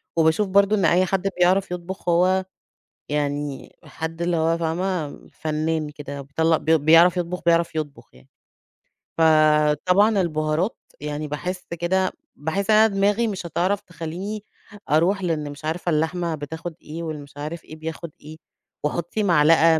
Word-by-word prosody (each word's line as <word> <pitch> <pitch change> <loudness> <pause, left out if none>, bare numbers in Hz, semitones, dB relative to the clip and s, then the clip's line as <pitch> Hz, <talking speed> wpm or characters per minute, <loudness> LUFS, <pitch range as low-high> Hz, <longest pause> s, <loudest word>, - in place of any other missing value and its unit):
وباشوف 165 +5 +3
برضه 200 +2 +4
إن 195 -5 +1
أي 180 +3 +4
حد 195 +1 0
بيعرَف 185 +1 +3
يطبُخ 180 +1 -5
هو 185 +2 +3 0.6
يعني 145 -1 -3
حد 165 +1 -6
اللي 170 -1 +1
هو 165 +1 +2
فاهمة، 170 -1 -2 0.2
فنان 155 0 -2
كده 145 -1 -7
بيطلّع 160 +4 +1
بي 160 +2 +3
بيعرَف 165 +4 +6
يطبُخ، 180 +1 -3
بيعرف 170 0 +2
يطبُخ 150 -3 -5
يعني، 65 +1 -20 0.9
فطبعًا 160 +6 +4
البُهارات 155 +3 -1 0.2
يعني 150 +1 -4
باحس 180 +5 -4
كده 185 +2 +1 0.2
باحس 175 +7 -3
إن 215 - +6
أنا 220 +1 +7
دماغي 205 +4 +2
مش 200 -4 -4
هتعرَف 180 +4 0
تخلّيني 180 +5 -6 0.5
أرُوح 175 +6 +3
لأن 150 -4 -1
مش 145 +2 -10
عارفة 165 +3 -2
اللحمة 165 +1 0
بتاخد 160 +3 -6
إيه 165 +2 -7
والمش 145 -3 -7
عارف 155 +3 -5
إيه 155 - -11
بياخد 160 +1 -6
إيه 155 +1 -11 0.5
وحُطّي 170 +7 -1
معلقة 165 -2 +5
165 Hz, 145 wpm, -23 LUFS, 155-180 Hz, 0.9 s, أنا